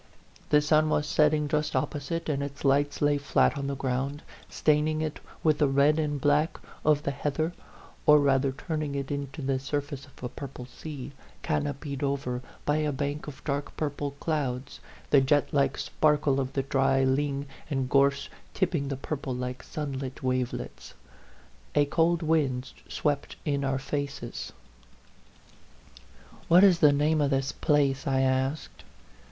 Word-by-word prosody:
The 150 0 +5
sun 155 +1 +3
was 150 -1 +1
setting 150 0 +3
just 150 -1 -1
op 130 - +1
posite, 155 +3 -4
and 145 -3 0
its 140 0 -6
lights 145 +2 +2
lay 145 0 +3
flat 145 - +2
on 140 -1 -3
the 140 - -2
ground, 135 +2 -2 0.3
staining 155 +1 +2
it 155 -1 -3 0.2
with 155 -2 +3
the 150 - +4
red 140 +3 +3
and 150 -2 -1
black 145 +3 +2 0.3
of 150 -1 +3
the 140 - 0
heather, 150 +4 -2 0.5
or 150 - +9
rather 135 -1 +3
turning 150 0 -3
it 140 0 -3
into 140 +1 -4
the 135 0 0
surface 145 +1 -4
of 130 - -17
a - - -1
purple 135 -2 -8
sea, 140 +1 -8 0.3
canopied 145 -2 -2
over 135 -3 -1 0.2
by 145 +1 +2
a 155 -1 0
bank 145 +2 -3
of 135 -2 -9
dark 140 -1 -3
purple 145 -2 -3
clouds 140 -4 -2 0.3
the 140 - +7
jetlike 140 0 +2
sparkle 150 -3 +2
of 130 -1 -2
the 135 - 0
dry 135 -1 +2
ling 140 +1 0 0.2
and 135 -3 -1
gorse 140 +1 +3 0.3
tipping 165 -7 0
the 135 -1 -3
purple 135 -2 -4
like 125 0 -4
sunlit 135 -3 -5
wavelets. 125 - -3 0.8
A 145 - +5
cold 165 +3 +2
wind 140 -5 +1 0.2
swept 145 -2 -1
in 140 -2 0
our 135 -1 0
faces. 140 -3 -4 0.9
" - - -24
What 175 +3 +7
is 185 -4 +6
the 150 -2 +7
name 150 +2 +2
of 145 - +2
this 135 -1 0
place?" 140 -3 +1
I 135 -1 +2
asked. 130 +3 -1
140 Hz, 160 wpm, -28 LUFS, 135-150 Hz, 0.9 s, or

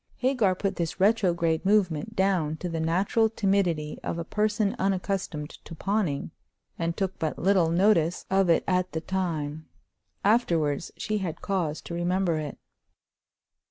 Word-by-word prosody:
Hagar 250 -8 +2
put 195 0 -2
this 170 -2 -3
retrograde 175 -6 +2
movement 200 0 +1
down 185 -6 +1
to 180 - -4
the 165 -1 -3
natural 190 +7 +2
timidity 190 -8 0
of - - -3
a 170 - -2
person 210 +1 0
unaccustomed 185 -5 -1
to 165 - -9
pawning, 185 -6 -1 0.5
and 165 0 -1
took 190 -1 -2
but 160 -2 -2
little 185 -3 +3
notice 175 -1 +2
of 190 -2 +3
it 165 - +4
at 185 -1 +1
the 160 - -2
time. 160 -5 -3 0.6
Afterwards 170 - +2
she 215 -1 -1
had 180 -5 -5
cause 175 -6 -1
to - - -8
remember 175 -1 0
it. 150 -2 -5
180 Hz, 145 wpm, -27 LUFS, 165-200 Hz, 0.6 s, it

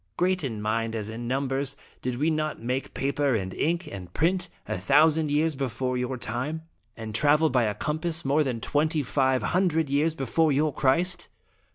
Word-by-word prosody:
Great 185 -1 +1
in 115 -6 -3
mind 115 +1 -1
as 110 -1 -3
in 115 +2 -5
num 135 +2 0
bers, 135 +1 -1 0.3
did 125 -1 -2
we 155 +5 +2
not 155 -1 -1
make 125 +4 -3
paper 140 -1 +1
and 95 -3 -2
ink, 170 +3 0
and 95 -10 -8
print, 180 +3 +1 0.2
a - - -2
thousand 155 +2 +4
years 150 +1 +1
before 130 -1 -2
your 125 +1 -2
time? 130 +8 -3 0.3
and 110 -1 -6
travel 150 +6 +3
by 125 -2 +3
a 105 -1 -1
compass 160 +1 -2
more 145 +3 +3
than 125 -5 -2
twenty 150 +5 0
five 130 0 +1
hundred 160 -5 +1
years 155 +3 +2
before 155 +3 +1
your 145 +1 +2
Christ?" 175 +8 +1
140 Hz, 185 wpm, -26 LUFS, 125-160 Hz, 0.3 s, thousand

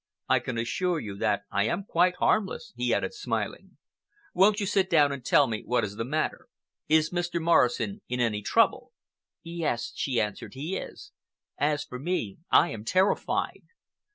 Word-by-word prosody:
I - - +4
can 125 - -5
assure 175 +9 0
you 105 -7 -6
that 100 -1 0
I 100 +1 +1
am 170 - -1
quite 180 -1 +2
harmless," 215 +4 0
he 125 0 -1
added - - 0
smiling. 420 - -4 0.6
"Won't 200 +3 +4
you 205 - -1
sit 190 -1 +1
down 150 -5 +4
and 140 -3 -5
tell - - +5
me 110 -2 -3
what 125 0 +1
is 100 -1 -4
the 115 - -3
matter? 155 - -2 0.4
Is 160 +1 +3
Mr. 175 -1 -1
Morrison 170 - +2
in 125 0 -2
any 110 -4 0
trouble?" - - +2 0.5
"Yes," 165 -8 -2
she 130 -4 -1
answered, 105 +3 -3
"he 155 +8 -4
is. 410 - -8 0.5
As 145 0 +1
for 125 - -8
me, 145 - -2
I - - +5
am 110 -2 -6
terrified." 185 - 0
150 Hz, 170 wpm, -27 LUFS, 115-180 Hz, 0.6 s, tell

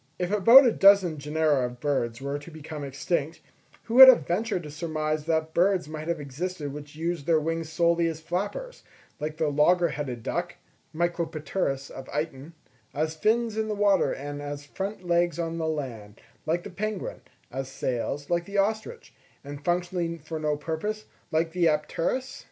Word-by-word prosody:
If 180 +1 -2
about 230 +7 +8
a 240 - +5
dozen 195 -7 +5
genera 150 -3 +1
of 125 0 -11
birds 125 -5 -1
were 140 +2 -3
to 145 - -12
become 155 -2 -8
extinct, 145 +3 -2 0.4
who 230 - -6
would 260 +2 +12
have 260 -2 +7
ventured 180 0 -1
to 150 - -8
surmise 155 -1 -2
that 160 -1 0
birds 185 -1 +2
might 155 0 -6
have 170 -2 -1
existed 145 +1 -5
which 145 0 -9
used 165 -2 -3
their 165 -2 +4
wings 165 +1 -3
solely 170 +1 +2
as 160 -1 -3
flappers, 205 - -4 0.4
like 155 +1 -4
the 155 - +1
logger 170 +4 +3
headed 135 -6 -5
duck - - -3 0.4
(Micropterus 160 -4 -2
of 135 - -9
Eyton); 150 0 -4 0.4
as 155 +2 0
fins 220 +6 +1
in 220 0 -1
the 215 - -2
water 200 -1 +3
and 145 +1 -5
as 145 0 -6
front 190 +5 -5
legs 175 -2 +2
on 165 -1 -3
the 160 - -1
land, 120 -9 -5 0.3
like 170 +2 0
the 205 - -8
penguin; 210 +1 -4 0.3
as 135 +1 -4
sails, 135 +2 -3
like 175 0 0
the 200 +2 -5
ostrich; 220 - -1 0.3
and 145 0 -8
functionally 175 0 -1
for 160 +1 -6
no 150 -1 0
purpose, 165 +8 -4 0.2
like 160 +1 0
the 175 -1 +2
apteryx? 165 - -1
160 Hz, 175 wpm, -27 LUFS, 145-180 Hz, 0.4 s, would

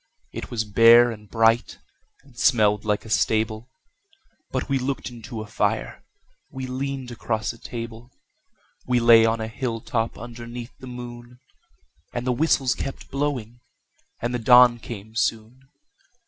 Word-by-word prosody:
It - - -7
was 115 -3 -1
bare 115 +3 +6
and 105 -2 -11
bright, 115 +1 +2 0.5
and 135 -3 -21
smelled 105 -4 +3
like 105 0 0
a - - -10
stable 110 +2 0 0.8
But - - -3
we 135 -2 +1
looked 130 0 -3
into 115 -1 -8
a - - -6
fire, - - -2 0.5
we 130 0 -6
leaned 130 0 -4
across 110 -1 -2
a 115 - -16
table, 115 0 -8 0.8
We 125 -1 +3
lay 115 -1 +7
on 115 0 0
a 110 - -3
hilltop 115 -1 -3
underneath 120 +1 -8
the 130 - -10
moon; 120 0 -9 0.7
And 120 0 -3
the 130 - +1
whistles 135 -1 +2
kept 135 - -7
blowing, 130 -5 -3 0.6
and 120 +1 -2
the 125 - -1
dawn 125 0 +6
came 110 -2 -9
soon. 115 +4 -2
120 Hz, 145 wpm, -24 LUFS, 110-125 Hz, 0.8 s, lay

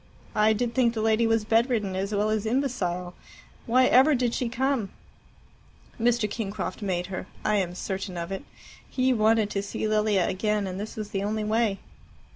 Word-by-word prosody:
I 215 +1 +4
did 235 +2 -1
think 235 -1 +2
the 220 - -1
lady 225 +1 +3
was 225 -1 +1
bedridden 225 -3 +1
as 195 +2 -2
well 210 +1 +1
as 215 0 -1
imbecile. 190 -9 -1 0.5
Why 255 +2 +5
ever 270 +4 +5
did 245 -2 0
she 245 - -1
come?" 260 -4 0 1.1
"Mr. 235 -1 +2
Kingcroft 205 -2 -4
made 180 -3 -1
her. - - -5 0.2
I 210 0 +3
am 180 -3 -1
certain 190 -1 -4
of 170 +2 -4
it. 195 - -4 0.5
He 255 0 +2
wanted 220 -2 +3
to 200 - -1
see 200 +2 -3
Lilia 210 -3 +2
again, 210 +1 0
and 185 0 -5
this 210 +2 -6
was 215 -1 -6
the 195 - -1
only 215 +1 -1
way." 215 -1 +1
215 Hz, 180 wpm, -26 LUFS, 195-235 Hz, 1.1 s, Why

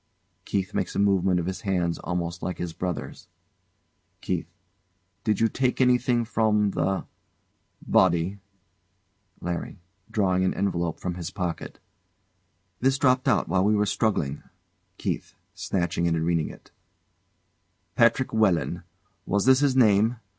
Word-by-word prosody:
[KEITH 95 -2 -2
makes - - -2
a - - -1
movement 95 -2 +3
of 85 - -2
his 95 +1 -4
hands 90 -5 -1
almost 85 -1 -3
like 90 -2 -3
his 85 -2 -4
brother's.] 90 0 -5 0.9
KEITH. - - -2 0.8
Did 105 -2 +1
you 115 - +4
take 130 +2 -1
anything 125 -2 +3
from 105 -2 +2
the 95 0 -1 0.8
body? 90 +2 +2 1.0
LARRY. 90 +3 -4 0.3
[Drawing 95 -4 +1
au 95 - 0
envelope 85 -4 -1
from 90 - -3
his 85 -2 -5
pocket] 90 -4 -4 1.0
This 135 +2 +2
dropped 130 -2 +2
out - - +2
while 95 -1 +2
we 105 +2 +3
were 105 0 +2
struggling. 95 - 0 0.6
KEITH. - - -4 0.2
[Snatching 85 -2 -1
it 85 - +1
and 80 0 -1
reading] 85 -2 -1 1.4
"Patrick 120 +1 +3
Walenn" 105 -6 +1 0.5
Was 100 0 +1
that 130 0 +6
his 140 -2 +2
name? 110 -1 +4
95 Hz, 130 wpm, -26 LUFS, 90-110 Hz, 1.4 s, that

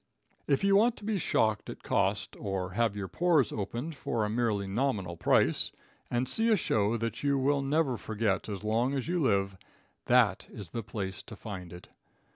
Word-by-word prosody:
If 140 +4 +2
you 200 0 +4
want 225 +4 +4
to - - -11
be 210 -2 -1
shocked 110 -8 +1
at - - -8
cost, - - 0
or 95 -2 -3
have 110 +1 +1
your 100 -2 -4
pores 165 - +2
opened 120 +9 -4
for 115 -6 -2
a 105 - -2
merely 110 -3 0
nominal 100 -4 -1
price, - - +2 0.4
and 125 +1 0
see 225 - +2
a 220 - +5
show 110 - +1
that 115 0 -3
you 140 -1 +2
will 140 +1 +2
never 140 -2 +1
forget 110 -3 -1
as 100 -1 -5
long 115 +5 +1
as 135 0 -2
you 175 +1 0
live, 100 - +1 0.5
that - - +3
is 95 -6 -9
the 115 - -3
place 100 -3 -5
to 110 - -10
find 95 -5 -7
it. 90 0 -11
115 Hz, 190 wpm, -30 LUFS, 100-140 Hz, 0.5 s, a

